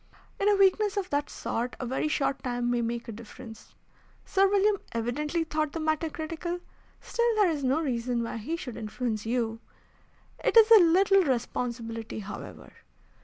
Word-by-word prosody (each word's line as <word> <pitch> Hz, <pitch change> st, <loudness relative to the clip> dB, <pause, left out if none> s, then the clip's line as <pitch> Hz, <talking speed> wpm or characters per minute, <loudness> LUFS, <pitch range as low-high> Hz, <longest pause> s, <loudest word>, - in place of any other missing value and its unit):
In 405 Hz, -, +3 dB
a 415 Hz, -, +5 dB
weakness 395 Hz, +1 st, +3 dB
of 385 Hz, -2 st, -2 dB
that 290 Hz, 0 st, 0 dB
sort 240 Hz, +2 st, -3 dB
a 255 Hz, -, -3 dB
very 265 Hz, +5 st, -1 dB
short 275 Hz, -2 st, 0 dB
time 245 Hz, -1 st, -1 dB
may 240 Hz, -1 st, +1 dB
make 235 Hz, +1 st, -3 dB
a -, -, -5 dB
difference. 225 Hz, +1 st, -12 dB, 0.5 s
Sir 390 Hz, 0 st, +3 dB
William 405 Hz, +1 st, +3 dB, 0.2 s
evidently 295 Hz, +9 st, -1 dB
thought 310 Hz, -2 st, -2 dB
the 330 Hz, -, -3 dB
matter 315 Hz, 0 st, 0 dB
critical. 330 Hz, +3 st, -4 dB, 0.4 s
Still, 470 Hz, -1 st, 0 dB
there 410 Hz, -5 st, +4 dB
is 295 Hz, -3 st, -3 dB
no 270 Hz, +5 st, +2 dB
reason 245 Hz, -4 st, -1 dB
why 230 Hz, -, -4 dB
he 250 Hz, +10 st, -3 dB
should 255 Hz, -9 st, -7 dB
influence 220 Hz, 0 st, -3 dB
you. 225 Hz, -2 st, -1 dB, 0.8 s
It -, -, +3 dB
is 450 Hz, 0 st, +7 dB
a 435 Hz, -5 st, +10 dB
little 385 Hz, +4 st, +5 dB
responsibility, 235 Hz, -4 st, -3 dB
however. 210 Hz, -1 st, -8 dB
275 Hz, 170 wpm, -28 LUFS, 235-350 Hz, 0.8 s, a